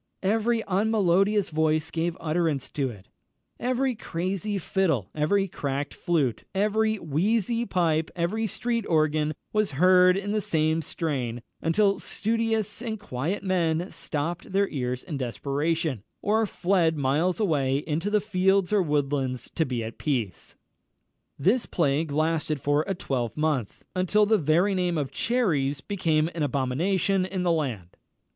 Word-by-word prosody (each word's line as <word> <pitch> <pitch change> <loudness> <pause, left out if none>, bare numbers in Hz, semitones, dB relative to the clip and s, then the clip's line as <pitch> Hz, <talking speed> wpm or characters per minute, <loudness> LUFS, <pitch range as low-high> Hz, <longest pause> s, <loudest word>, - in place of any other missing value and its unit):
Every 225 +3 +1
unmelodious 200 -1 +2
voice 155 0 +1
gave 165 +1 -1
utterance 160 -3 -1
to 140 -3 -1
it; 100 -5 -12 0.5
every 255 +1 0
crazy 195 +1 -3
fiddle, 165 - 0
every 195 +7 +1
cracked 140 -4 -3
flute, 145 -10 0
every 215 +2 +2
wheezy 215 - 0
pipe, 165 -3 +1
every 200 +6 -1
street 235 +1 -1
organ 155 -1 +2 0.2
was 215 -7 +1
heard 180 +2 +6
in 200 +1 -3
the 215 0 +1
same 160 -2 +1
strain, 130 -7 -3 0.2
until 195 +4 +2
studious 225 -1 -1
and 220 -3 -4
quiet 175 +2 -3
men 175 -2 0
stopped 165 +2 -4
their 200 +1 +2
ears 125 -2 -3
in 155 -6 -5
desperation, 140 - -1 0.2
or 220 +1 +1
fled 175 -5 +1
miles 150 +8 +1
away 140 -10 +1
into 160 +6 -2
the 210 0 +3
fields 195 -1 +2
or 205 - +4
woodlands 140 -5 -1
to 160 - 0
be 120 -3 -2
at 110 +1 -7
peace. 120 - -3 0.8
This 205 - +2
plague 150 -1 0
lasted 155 0 0
for 145 +3 +1
a 195 - -1
twelvemonth, 135 - -2
until 185 +3 +3
the 215 0 +3
very 170 +6 +2
name 180 -2 0
of 140 -3 -2
cherries 150 - 0
became 160 -2 0
an 165 - -4
abomination 160 +8 +1
in 185 0 -3
the 175 - +2
land. 125 - -2
165 Hz, 140 wpm, -26 LUFS, 145-200 Hz, 0.8 s, heard